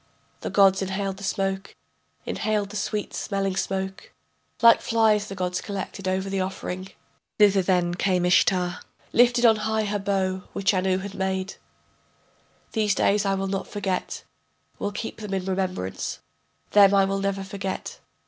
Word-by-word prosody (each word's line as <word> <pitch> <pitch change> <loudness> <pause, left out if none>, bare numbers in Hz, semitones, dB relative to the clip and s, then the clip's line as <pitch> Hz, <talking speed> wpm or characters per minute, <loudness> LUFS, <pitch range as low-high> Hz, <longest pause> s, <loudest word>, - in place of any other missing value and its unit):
The - - -4
gods 195 -1 +4
inhaled 195 0 -2
the 200 - -10
smoke, 195 0 -2 0.5
inhaled 210 -2 -1
the - - -9
sweet 210 0 -2
smelling 195 -2 -2
smoke, 190 0 -3 0.5
Like 230 0 +7
flies 220 -2 +2
the 195 - -7
gods 180 -1 -2
collected 195 -1 -5
over 190 +1 0
the 195 -1 -1
offering. 185 0 -4 0.5
Thither 200 -2 +5
then 180 -2 +1
came 180 0 +1
Ishtar, 180 0 +3 0.3
Lifted 240 0 +4
on 225 -2 +6
high 220 0 0
her 205 0 -1
bow, 190 -1 -1
which 200 +1 +1
Anu 185 0 +1
had 195 +1 -6
made: 190 0 -2 1.2
These 210 -3 +1
days 200 +1 +2
I 195 - +2
will 195 0 -2
not 195 0 -3
forget, 195 -3 -3 0.6
will 205 - -2
keep 215 +2 -5
them 205 -2 -3
in 190 -1 -3
remembrance, 185 - -2 0.5
Them 200 -1 +7
I 195 -1 +5
will 195 0 -1
never 195 0 -1
forget. 195 -1 -5
195 Hz, 155 wpm, -25 LUFS, 190-205 Hz, 1.2 s, Like